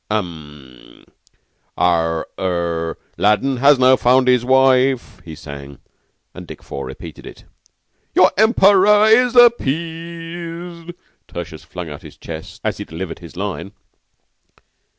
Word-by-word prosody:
"Um! 75 Hz, -10 st, -7 dB, 0.7 s
Ah! 80 Hz, -2 st, +1 dB, 0.2 s
Er 85 Hz, -3 st, -2 dB, 0.2 s
'Aladdin 105 Hz, +6 st, +2 dB
now 125 Hz, -, -5 dB
has 140 Hz, 0 st, +6 dB, 0.3 s
won 125 Hz, +1 st, +4 dB
his 125 Hz, -1 st, +3 dB
wife,'" 130 Hz, -4 st, +2 dB
he 80 Hz, -2 st, -9 dB
sang, 70 Hz, -2 st, -10 dB, 0.6 s
and -, -, -11 dB
Dick -, -, -11 dB
Four 70 Hz, -, -7 dB
repeated -, -, -10 dB
it. -, -, -13 dB, 0.7 s
"'Your -, -, +5 dB
Emperor 210 Hz, -1 st, +5 dB
is 240 Hz, +3 st, +4 dB
appeased.'" 170 Hz, -, 0 dB, 0.3 s
Tertius 80 Hz, -2 st, -8 dB
flung 90 Hz, -3 st, -8 dB
out 75 Hz, +2 st, -9 dB
his 80 Hz, -4 st, -14 dB
chest 80 Hz, -1 st, -9 dB
as -, -, -2 dB
he -, -, -5 dB
delivered 85 Hz, +2 st, -7 dB
his 85 Hz, -2 st, -13 dB
line. 95 Hz, -1 st, -5 dB
110 Hz, 120 wpm, -19 LUFS, -, 0.7 s, has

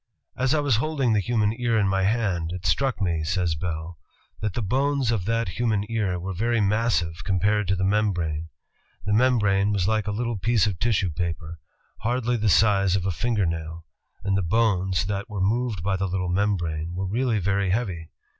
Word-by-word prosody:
"As 130 Hz, +3 st, +1 dB
I -, -, +2 dB
was 140 Hz, -6 st, +2 dB
holding 135 Hz, -3 st, 0 dB
the 105 Hz, -, +3 dB
human 105 Hz, +1 st, +1 dB
ear 120 Hz, -2 st, +1 dB
in 105 Hz, -2 st, +2 dB
my 95 Hz, 0 st, +1 dB
hand, 100 Hz, -7 st, 0 dB
it 90 Hz, -1 st, -7 dB
struck 125 Hz, -, +1 dB
me," 85 Hz, -4 st, 0 dB
says 90 Hz, 0 st, 0 dB
Bell, 80 Hz, 0 st, -5 dB, 0.4 s
"that 105 Hz, -3 st, -3 dB
the 120 Hz, -, -1 dB
bones 135 Hz, +3 st, +1 dB
of 105 Hz, -6 st, -1 dB
that 115 Hz, -2 st, 0 dB
human 110 Hz, +1 st, 0 dB
ear 100 Hz, -6 st, 0 dB
were 95 Hz, +2 st, -4 dB
very 115 Hz, +5 st, 0 dB
massive 100 Hz, -5 st, 0 dB
compared 100 Hz, +2 st, +1 dB
to 95 Hz, -, +2 dB
the 95 Hz, -, -2 dB
membrane. 90 Hz, -6 st, 0 dB, 0.6 s
The 100 Hz, -, 0 dB
membrane 105 Hz, -4 st, +3 dB
was 100 Hz, -3 st, 0 dB
like 110 Hz, -1 st, 0 dB
a -, -, 0 dB
little 115 Hz, 0 st, -2 dB
piece 110 Hz, 0 st, +2 dB
of 100 Hz, -5 st, -2 dB
tissue 100 Hz, -6 st, +1 dB
paper, 85 Hz, 0 st, -4 dB, 0.4 s
hardly 120 Hz, +1 st, 0 dB
the 110 Hz, -2 st, +1 dB
size 100 Hz, -2 st, +4 dB
of 95 Hz, -2 st, -1 dB
a 95 Hz, -, +1 dB
finger 110 Hz, +1 st, 0 dB
nail, 80 Hz, 0 st, -4 dB, 0.4 s
and 100 Hz, -1 st, 0 dB
the 95 Hz, -, +2 dB
bones 95 Hz, -2 st, +1 dB
that 100 Hz, +3 st, -3 dB
were 105 Hz, -2 st, -5 dB
moved 105 Hz, -1 st, 0 dB
by 95 Hz, 0 st, 0 dB
the 95 Hz, 0 st, -1 dB
little 90 Hz, -1 st, -2 dB
membrane 85 Hz, -4 st, -1 dB
were 95 Hz, +1 st, -2 dB
really 115 Hz, +4 st, 0 dB
very 100 Hz, 0 st, 0 dB
heavy. 90 Hz, -6 st, -2 dB
100 Hz, 195 wpm, -25 LUFS, 90-115 Hz, 0.6 s, size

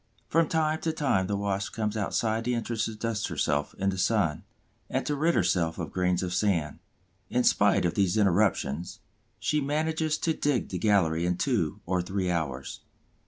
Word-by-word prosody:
From 165 Hz, 0 st, +3 dB
time 160 Hz, 0 st, 0 dB
to 160 Hz, -, 0 dB
time 135 Hz, -12 st, +1 dB
the 100 Hz, 0 st, -1 dB
Wasp 100 Hz, -1 st, -2 dB
comes 105 Hz, -1 st, -2 dB
outside 110 Hz, +2 st, 0 dB
the 125 Hz, +1 st, 0 dB
entrance 115 Hz, -1 st, -1 dB
to 110 Hz, -, -5 dB
dust 110 Hz, -1 st, -2 dB
herself 75 Hz, 0 st, -1 dB
in 95 Hz, 0 st, 0 dB
the 95 Hz, -, -4 dB
sun, 95 Hz, -5 st, +1 dB, 0.5 s
and -, -, -1 dB
to 150 Hz, -, 0 dB
rid 165 Hz, +4 st, +2 dB
herself 80 Hz, -3 st, +1 dB
of 85 Hz, -3 st, -5 dB
grains 90 Hz, 0 st, 0 dB
of 90 Hz, -1 st, -3 dB
sand. 90 Hz, -6 st, 0 dB, 0.5 s
In 125 Hz, -, +1 dB
spite 100 Hz, -5 st, +3 dB
of 85 Hz, -, +1 dB
these 100 Hz, 0 st, +1 dB
interruptions, 95 Hz, -5 st, +1 dB, 0.4 s
she 150 Hz, -, 0 dB
manages 155 Hz, +2 st, 0 dB
to 165 Hz, -, 0 dB
dig 145 Hz, -5 st, 0 dB
the 90 Hz, -, -3 dB
gallery 85 Hz, -6 st, +2 dB
in 90 Hz, 0 st, 0 dB
two -, -, 0 dB
or 90 Hz, 0 st, 0 dB
three 95 Hz, 0 st, -2 dB
hours. 70 Hz, -6 st, -3 dB
100 Hz, 180 wpm, -28 LUFS, 90-125 Hz, 0.5 s, From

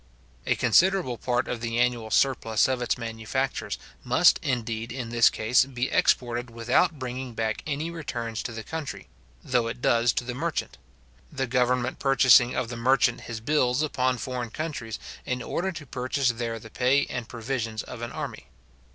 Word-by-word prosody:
A -, -, +3 dB
considerable 180 Hz, -10 st, +3 dB
part 120 Hz, -1 st, 0 dB
of 120 Hz, -2 st, -4 dB
the 115 Hz, 0 st, -2 dB
annual 120 Hz, -2 st, +1 dB
surplus 115 Hz, -2 st, +2 dB
of 130 Hz, -1 st, -1 dB
its 120 Hz, -, 0 dB
manufactures 115 Hz, +3 st, -3 dB, 0.3 s
must, -, -, +5 dB
indeed, 115 Hz, -3 st, -2 dB
in 125 Hz, -2 st, -5 dB
this 115 Hz, 0 st, +5 dB
case, 115 Hz, +4 st, +3 dB
be 130 Hz, -1 st, -3 dB
exported 120 Hz, 0 st, +1 dB
without 125 Hz, +8 st, +1 dB
bringing 130 Hz, -2 st, -5 dB
back 110 Hz, -1 st, -1 dB
any 155 Hz, +3 st, -2 dB
returns 120 Hz, -9 st, -4 dB
to -, -, -5 dB
the 115 Hz, -1 st, -6 dB
country, 160 Hz, +1 st, -6 dB, 0.3 s
though 125 Hz, -2 st, +1 dB
it 115 Hz, +1 st, -5 dB
does 120 Hz, -1 st, +3 dB
to -, -, -1 dB
the 125 Hz, 0 st, -4 dB
merchant; 160 Hz, +5 st, -3 dB, 0.5 s
the 135 Hz, -, -1 dB
government 125 Hz, 0 st, +1 dB
purchasing 125 Hz, -2 st, +5 dB
of 125 Hz, -2 st, -1 dB
the 120 Hz, -, -5 dB
merchant 120 Hz, 0 st, +3 dB
his 115 Hz, -2 st, -6 dB
bills 125 Hz, +2 st, +1 dB
upon 130 Hz, -4 st, 0 dB
foreign 125 Hz, 0 st, -4 dB
countries, 140 Hz, -6 st, -4 dB, 0.3 s
in 125 Hz, -1 st, -3 dB
order 190 Hz, +3 st, -2 dB
to 155 Hz, -4 st, -8 dB
purchase 130 Hz, +1 st, 0 dB
there 115 Hz, -1 st, -2 dB
the 110 Hz, 0 st, -12 dB
pay 130 Hz, +4 st, +3 dB
and 120 Hz, -2 st, -5 dB
provisions 115 Hz, -2 st, -3 dB
of 125 Hz, -2 st, -9 dB
an 120 Hz, -, -4 dB
army. -, -, -6 dB
125 Hz, 170 wpm, -26 LUFS, 115-130 Hz, 0.5 s, must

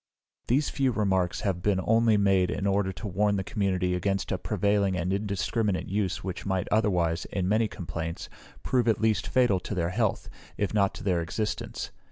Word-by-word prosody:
These 135 Hz, +5 st, +2 dB
few 135 Hz, -2 st, +1 dB
remarks 95 Hz, -5 st, 0 dB
have 95 Hz, -4 st, -1 dB
only 110 Hz, +3 st, +3 dB
been 100 Hz, -, +2 dB
made 95 Hz, -2 st, +3 dB
in 100 Hz, -, -2 dB
order 100 Hz, -1 st, +1 dB
to 90 Hz, +4 st, -7 dB
warn 100 Hz, +2 st, +1 dB
the 95 Hz, -, -1 dB
community 90 Hz, -1 st, 0 dB
against 95 Hz, +2 st, -1 dB
a -, -, -1 dB
prevailing 100 Hz, -2 st, +1 dB
and 90 Hz, +2 st, -1 dB
indiscriminate 100 Hz, 0 st, -1 dB
use 95 Hz, -2 st, -1 dB
which 95 Hz, -1 st, -5 dB
might 95 Hz, -2 st, -1 dB
otherwise, 90 Hz, -6 st, +1 dB
in 95 Hz, -2 st, -2 dB
many 110 Hz, +3 st, +2 dB
complaints, 85 Hz, -3 st, -5 dB, 0.4 s
prove 125 Hz, -2 st, +1 dB
at 110 Hz, -3 st, +3 dB
least 110 Hz, -1 st, +1 dB
fatal 120 Hz, -7 st, +3 dB
to 105 Hz, -, -5 dB
their 85 Hz, -1 st, 0 dB
health, 110 Hz, 0 st, 0 dB, 0.3 s
if 105 Hz, -, -1 dB
not 100 Hz, -2 st, +2 dB
to -, -, -8 dB
their 90 Hz, -4 st, +1 dB
existence. 105 Hz, +7 st, -3 dB
100 Hz, 185 wpm, -27 LUFS, 90-105 Hz, 0.4 s, only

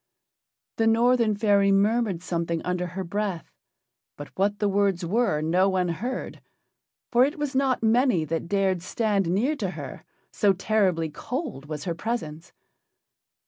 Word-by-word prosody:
The 225 Hz, -, +2 dB
Northern 230 Hz, -1 st, +3 dB
fairy 200 Hz, -2 st, +3 dB
murmured 200 Hz, -2 st, +1 dB
something 170 Hz, -2 st, -2 dB
under 180 Hz, 0 st, -2 dB
her 185 Hz, +2 st, -5 dB
breath, 195 Hz, -1 st, -3 dB, 0.7 s
but 145 Hz, -, -8 dB
what 205 Hz, +2 st, +1 dB
the 205 Hz, -, 0 dB
words 195 Hz, -3 st, +1 dB
were 200 Hz, -4 st, +1 dB
no 180 Hz, +5 st, +3 dB
one 185 Hz, -2 st, 0 dB
heard, 240 Hz, +10 st, -4 dB, 0.7 s
for 245 Hz, +1 st, +5 dB
it 285 Hz, +4 st, 0 dB
was 295 Hz, -2 st, -3 dB
not 265 Hz, -2 st, +1 dB
many 225 Hz, -, +3 dB
that 165 Hz, +2 st, -3 dB
dared 190 Hz, -2 st, +1 dB
stand 200 Hz, -2 st, 0 dB
near 235 Hz, -, +1 dB
to 195 Hz, -7 st, -2 dB
her, 145 Hz, -7 st, -8 dB, 0.3 s
so 200 Hz, -2 st, +3 dB
terribly 185 Hz, -5 st, 0 dB
cold 245 Hz, -, -5 dB
was 150 Hz, -1 st, -5 dB
her 170 Hz, -, -2 dB
presence. 165 Hz, -5 st, -5 dB
195 Hz, 145 wpm, -25 LUFS, 170-225 Hz, 0.7 s, for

